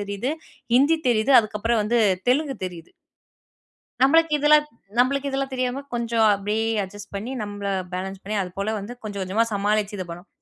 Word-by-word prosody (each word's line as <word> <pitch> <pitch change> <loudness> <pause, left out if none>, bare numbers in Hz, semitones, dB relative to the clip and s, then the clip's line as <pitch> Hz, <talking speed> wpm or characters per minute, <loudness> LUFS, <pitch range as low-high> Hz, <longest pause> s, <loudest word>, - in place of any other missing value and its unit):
தெரியுது, 200 +7 -3 0.4
ஹிந்தி 305 +5 +4
தெரியுது, 235 +3 +3
அதுக்கப்பறம் 215 +1 -1
வந்து 235 +2 +2 0.3
தெலுங்கு 275 0 +1
தெரியுது. 170 -2 -10 1.1
நம்மளுக்கு 325 +3 +5
இதெல்லாம் 300 +1 +5 0.3
நம்மளுக்கு 275 +3 +2
இதெல்லாம் 270 0 -2
தெரியாம, 255 +1 -2
கொஞ்சம் 230 -2 +2
அப்படியே 210 +3 -1 0.2
அட்ஜஸ்ட் 205 +1 -9
பண்ணி, 215 +6 -4
நம்ப 205 -1 -4 0.2
பேலன்ஸ் 190 +1 -5
பண்ணி, 210 +2 -3
அது 180 - -6
போல 215 +2 -1
வந்து 205 +5 -7
கொஞ்சம், 200 -2 -5
கொஞ்சமாக 215 +5 +1
சமாளிச்சு 205 +1 0
இது 185 - -3
பண்ணோம். 175 +3 -9
220 Hz, 155 wpm, -23 LUFS, 200-260 Hz, 1.1 s, நம்மளுக்கு